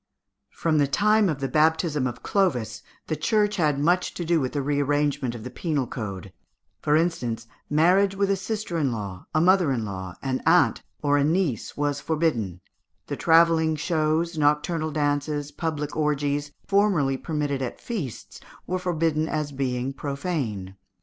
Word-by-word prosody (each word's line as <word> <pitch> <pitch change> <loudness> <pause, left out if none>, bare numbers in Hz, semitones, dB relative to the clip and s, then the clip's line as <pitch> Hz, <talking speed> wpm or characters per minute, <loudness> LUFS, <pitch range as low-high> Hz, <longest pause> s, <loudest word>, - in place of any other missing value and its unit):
From 160 -2 0
the 145 - +3
time 210 +6 +3
of 145 -4 -3
the 135 - 0
baptism 155 -1 +2
of 120 - -7
Clovis, 175 - 0 0.2
the 155 - -2
Church 210 +5 +1
had 150 -5 +2
much 175 +5 +1
to 175 - -4
do 165 -1 +2
with 130 - -2
the 145 - 0
re 145 +1 0
arrangement 145 -3 0
of 110 - -8
the 125 - -7
penal 145 -1 -1
code; 100 -6 -6 0.5
for 150 - +2
instance, 125 -9 0 0.2
marriage 185 +6 +4
with 200 0 +1
a - - +3
sister 195 -3 -3
in 140 -4 +1
law, 100 -5 -6
a - - +5
mother 180 -2 +4
in 115 -4 -1
law, 95 -3 -6
an 130 -1 -1
aunt, 175 +3 +4 0.2
or 145 0 +3
a - - +3
niece, 160 - 0
was 145 -1 -1
forbidden; 120 - -1 0.4
the - - -4
travelling 165 -1 +4
shows, 160 +1 0
nocturnal 155 +2 +1
dances, 145 0 -1
public 150 -1 -3
orgies, 145 -1 0
formerly 195 -10 +2
permitted 145 -1 -2
at 125 - -4
feasts, 180 - -6 0.3
were 185 0 -2
forbidden 165 -3 0
as 150 -1 -2
being 130 -1 -2
profane. 135 - -4
150 Hz, 165 wpm, -25 LUFS, 135-170 Hz, 0.5 s, a